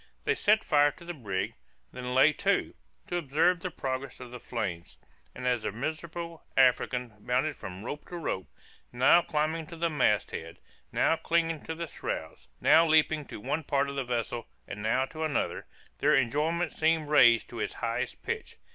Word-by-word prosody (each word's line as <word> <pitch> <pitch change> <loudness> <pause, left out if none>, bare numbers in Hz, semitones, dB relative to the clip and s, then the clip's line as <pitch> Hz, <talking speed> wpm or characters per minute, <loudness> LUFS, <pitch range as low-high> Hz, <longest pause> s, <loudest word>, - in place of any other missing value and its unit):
They - - +2
set 215 +1 +3
fire 145 -1 +4
to 170 - -15
the 175 - -4
brig, 100 - -3 0.4
then 125 0 -5
lay 145 +4 +6
to, - - 0 0.3
to 175 - -2
observe 165 +3 +2
the 185 - -4
progress 135 -4 -4
of 125 -1 -9
the 125 - -7
flames; 100 -9 -4 0.4
and 125 - -6
as 125 -2 +2
the - - -2
miserable 165 +7 -5
African 125 -2 +3
bounded 130 +7 0
from 95 -3 -8
rope 145 +5 -6
to 175 - -6
rope, 95 - -3 0.4
now 130 +8 +5
climbing 155 0 -1
to 170 - -9
the 170 0 -1
mast 115 -9 +2
head 80 +1 -7 0.3
now 165 - +2
clinging 165 -2 0
to 160 - -4
the 170 +1 -4
shrouds 80 - -6
now 165 - +6
leaping 155 -2 +3
to - - -8
one 150 +9 -2
part 140 0 +1
of 140 - -6
the 135 - -1
vessel, 120 -1 -3 0.2
and 105 - -6
now 115 +5 +2
to 160 +3 -6
another, 155 -3 -1 0.3
their - - +4
enjoyment 150 +6 +1
seemed 160 -1 +1
raised 120 -6 +6
to - - -7
its - - -2
heighest - - -3
pitch. - - -4
145 Hz, 180 wpm, -29 LUFS, 125-160 Hz, 0.4 s, lay